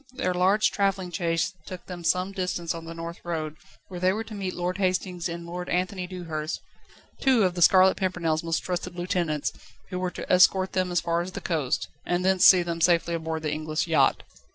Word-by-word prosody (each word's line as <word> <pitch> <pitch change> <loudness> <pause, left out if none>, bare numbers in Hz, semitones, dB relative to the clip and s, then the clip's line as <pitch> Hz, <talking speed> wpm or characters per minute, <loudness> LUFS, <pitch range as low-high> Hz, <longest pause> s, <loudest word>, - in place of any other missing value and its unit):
Their 250 -8 -1
large 190 +4 +3
travelling 195 -3 0
chaise 165 +1 0
took 185 -1 -8
them 180 -2 -8
some 180 +4 +1
distance 180 -3 -2
on 165 0 -8
the 165 0 -8
North 165 +1 -6
Road, 155 -3 -4 0.3
where 180 -2 -7
they 185 +1 +3
were 215 +3 -2
to 225 - -11
meet 195 -3 -4
Lord 180 +2 -2
Hastings 185 -2 -1
and 170 0 -6
Lord 180 +1 -6
Anthony 180 0 -1
Dewhurst, 165 -4 -4 0.6
two 260 -5 +4
of 185 -2 +2
The 175 - -4
Scarlet 185 +2 +6
Pimpernel's 170 -4 0
most 165 -1 -1
trusted 180 -1 -4
lieutenants, 175 -4 -1 0.4
who 180 - -3
were 185 0 -1
to - - -8
escort 185 +1 +5
them 185 -1 0
as 175 -2 +1
far 170 0 0
as 185 +2 -6
the - - -4
coast, 155 -7 -1 0.2
and 175 +1 -1
thence 190 -1 +6
see 180 -2 +7
them 170 -1 -4
safely 170 0 +3
aboard 160 -1 -3
the 150 -1 -1
English 155 0 -2
yacht. 155 -5 +2
180 Hz, 205 wpm, -26 LUFS, 165-185 Hz, 0.6 s, see